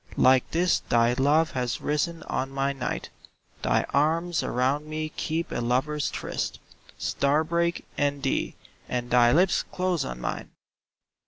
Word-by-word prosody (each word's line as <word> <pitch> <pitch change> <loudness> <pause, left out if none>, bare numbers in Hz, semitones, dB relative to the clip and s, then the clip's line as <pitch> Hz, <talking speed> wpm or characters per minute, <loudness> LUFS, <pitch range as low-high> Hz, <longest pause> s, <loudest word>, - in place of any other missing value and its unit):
Like 130 0 +5
this 175 +1 +2
thy 115 0 +2
love 150 +5 +3
has 125 -2 -2
risen 160 +3 -1
on 135 - -2
my 135 0 -1
night, 135 -2 -4 0.5
Thy - - +2
arms 165 +4 +2
around 135 +5 0
me 155 0 -3
keep 160 +2 -3
a - - -2
lover's 135 +5 0
tryst - - -4 0.2
— - - -23
Star 145 +3 +1
break 170 +1 -1
and 145 -1 0
thee, 135 - -1 0.3
and 120 -1 -3
thy 120 -1 +6
lips 180 +6 +3
close 180 -4 -1
on - - -6
mine! 60 - -4
145 Hz, 150 wpm, -26 LUFS, 130-160 Hz, 0.5 s, thy